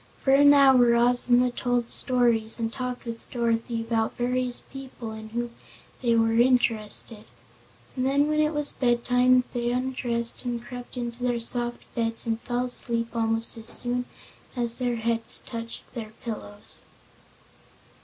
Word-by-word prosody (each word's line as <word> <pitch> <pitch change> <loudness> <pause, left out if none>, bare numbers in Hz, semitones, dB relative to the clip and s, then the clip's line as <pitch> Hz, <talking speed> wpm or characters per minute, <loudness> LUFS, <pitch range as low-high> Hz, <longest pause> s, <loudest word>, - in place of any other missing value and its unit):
For 270 - +3
an 285 +1 +7
hour 265 -4 +5
Ozma 245 +1 +3
told 245 -1 -1
stories, 235 -3 +2
and 225 -1 -3
talked 250 -1 -5
with 230 -1 -8
Dorothy 230 -1 -1
about 225 -1 -2
various 250 0 0
people 260 -4 -8
in 220 0 -9
whom 240 +1 -4 0.5
they 235 -2 +2
were 225 0 +2
interested. 230 -3 +2 0.7
And 255 0 -1
then 285 +2 +2
it 305 0 +2
was 295 -2 -1
bedtime, 245 0 +2
and 250 - +3
they 240 -1 -1
undressed 245 -2 0
and 240 -1 -3
crept 245 +1 -10
into 240 0 -5
their 245 -1 0
soft 240 +1 +1
beds 230 -1 -2
and 225 0 -2
fell 245 0 -2
asleep 235 -2 -2
almost 225 0 0
as 225 0 -6
soon 245 0 +1 0.5
as 240 -1 +1
their 245 -1 -1
heads 230 0 +1
touched 230 -1 -7
their 220 -3 -7
pillows. 205 -3 -6
240 Hz, 145 wpm, -25 LUFS, 230-250 Hz, 0.7 s, an